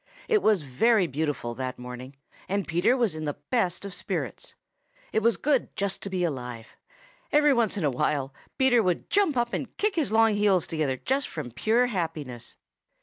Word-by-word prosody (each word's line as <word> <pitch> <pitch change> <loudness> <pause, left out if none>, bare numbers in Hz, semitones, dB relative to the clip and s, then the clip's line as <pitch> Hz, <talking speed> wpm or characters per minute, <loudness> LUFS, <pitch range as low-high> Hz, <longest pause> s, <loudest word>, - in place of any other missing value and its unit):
It 435 -3 +3
was 210 -7 +3
very 195 - +3
beautiful 145 -5 -2
that 130 +1 -4
morning, 125 +2 -8 0.3
and 200 +1 -1
Peter 175 +9 +2
was 235 -7 +1
in 155 0 -5
the 145 - -3
best 200 -7 0
of 200 - -6
spirits. - - -4 0.6
It 220 - +2
was 230 +1 +3
good 285 -3 0
just 200 -2 -2
to 200 - -5
be 185 -2 -1
alive. 125 -7 -4 0.6
Every 295 -1 +5
once 230 -5 +1
in 190 - -2
a 145 - +2
while 135 +1 -1 0.2
Peter 260 -3 +4
would 180 -4 -1
jump 390 -9 +3
up 240 0 0
and - - -4
kick 425 0 +1
his 315 -9 0
long 225 0 +5
heels 205 -3 +3
together 150 -5 -1
just 270 - 0
from 145 -7 -6
pure 225 - +2
happiness. 160 - -4
190 Hz, 185 wpm, -27 LUFS, 145-235 Hz, 0.6 s, Every